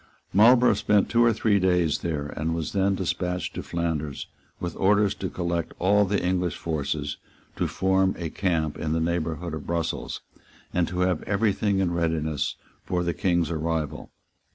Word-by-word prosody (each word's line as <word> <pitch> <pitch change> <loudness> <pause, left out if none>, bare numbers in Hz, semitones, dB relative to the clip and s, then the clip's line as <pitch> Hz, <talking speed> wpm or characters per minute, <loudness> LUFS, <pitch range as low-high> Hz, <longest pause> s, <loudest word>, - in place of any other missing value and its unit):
Marlborough 120 +4 +6
spent 105 0 +2
two 120 0 +4
or 120 - +5
three 110 -2 +2
days 90 -4 +2
there, 75 -4 -2
and 80 +2 -1
was 80 -2 -3
then 100 0 +2
despatched 90 -1 -2
to - - -4
Flanders 80 -4 -3 0.3
with 85 -2 -4
orders 100 +1 +3
to 95 - -4
collect 85 -2 -2
all 100 +3 +4
the 100 0 0
English 90 -2 0
forces, 75 -2 -2 0.4
to - - 0
form 95 0 +1
a 85 -3 -4
camp 80 -6 -1
in 80 0 -1
the 80 - +1
neighbourhood 85 0 -2
of 80 -2 -6
Brussels, 85 -1 -2 0.5
and 85 -2 +2
to 90 0 -2
have 90 -2 +1
every 100 +1 +2
thing 100 -1 0
in 95 -3 +1
readiness 80 -3 -1 0.3
for 90 -1 -1
the 85 -1 0
King's 85 -2 +1
arrival. 80 -2 -2
90 Hz, 170 wpm, -26 LUFS, 80-95 Hz, 0.5 s, Marlborough